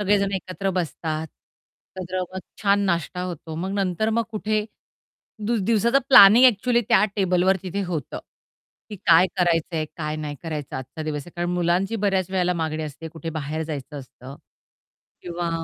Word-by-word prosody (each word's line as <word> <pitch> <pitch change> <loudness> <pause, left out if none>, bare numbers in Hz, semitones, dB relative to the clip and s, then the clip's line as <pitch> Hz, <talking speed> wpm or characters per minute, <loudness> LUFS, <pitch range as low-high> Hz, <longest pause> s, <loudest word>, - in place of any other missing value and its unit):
सगळेजण 200 -1 +2
एकत्र 190 +1 -3
बसतात. 160 -2 -3 0.7
एकत्र 185 +1 -3
मग 190 - -4 0.2
छान 200 0 +3
नाश्ता 170 0 -1
होतो 165 -3 -6
मग 185 +4 -3
नंतर 200 +2 0
मग - - +3
कुठे 215 0 -1 0.8
दि 235 - +1
दिवसाचं 230 +4 +3
प्लॅनिंग 235 0 +9
एक्चुअली 240 +1 +3
त्या 190 - +5
टेबलवर 185 -1 +2
तिथे 195 +2 -3
होतं. 165 -7 -4 0.7
की 210 - -6
काय 175 -1 +5
करायचंय 165 -2 +1
काय 155 -1 -3
नाही 150 -1 -5
करायचं 155 -4 -5
आजचा 130 +4 -7
दिवस 150 -1 -3
आहे, 175 - -13
कारण 175 0 -2
मुलांची 180 +4 0
बऱ्याच 190 -3 +1
वेळेला 180 -1 +1
मागणी 160 -2 -2
असते 155 +2 -7
कुठे 165 0 -6
बाहेर 155 +2 -3
जायचं 145 -2 -6
असतं. 130 +1 -12 0.9
किंवा, 175 -1 -4
175 Hz, 155 wpm, -23 LUFS, 160-195 Hz, 0.9 s, प्लॅनिंग